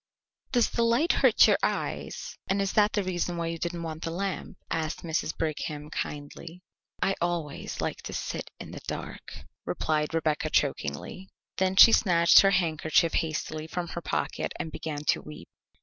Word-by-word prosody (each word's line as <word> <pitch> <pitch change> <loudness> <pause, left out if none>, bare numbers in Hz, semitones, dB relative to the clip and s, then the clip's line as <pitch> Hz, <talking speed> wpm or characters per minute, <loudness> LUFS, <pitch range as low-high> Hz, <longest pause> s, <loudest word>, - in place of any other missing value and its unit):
"Does 245 -3 +3
the 235 - 0
light 235 +9 +3
hurt - - +5
your - - +3
eyes, - - -3
and 195 - +1
is 195 -1 0
that 210 0 +4
the 205 - +1
reason 175 -1 -2
why 170 - -2
you 165 0 -3
didn't 170 0 -3
want 160 -1 -5
the 165 - -2
lamp?" 190 +3 -4
asked 160 -1 -2
Mrs. 165 -1 -2
Brigham 150 -1 -3
kindly. 160 +5 -6 0.4
"I 195 - +2
always 170 -4 -3
like - - -3
to - - -5
sit - - -4
in - - -8
the - - -8
dark," - - -6 0.3
replied 155 0 -1
Rebecca 155 -2 0
chokingly. 75 - -2 0.3
Then 190 0 +1
she 230 - +10
snatched 170 -6 +6
her 195 - +6
handkerchief 165 -3 +2
hastily 155 -1 -2
from 175 +1 -4
her 170 - -5
pocket - - -2
and 160 - -4
began 150 -2 -5
to - - +2
weep. 75 - -11
170 Hz, 170 wpm, -28 LUFS, 155-185 Hz, 0.4 s, she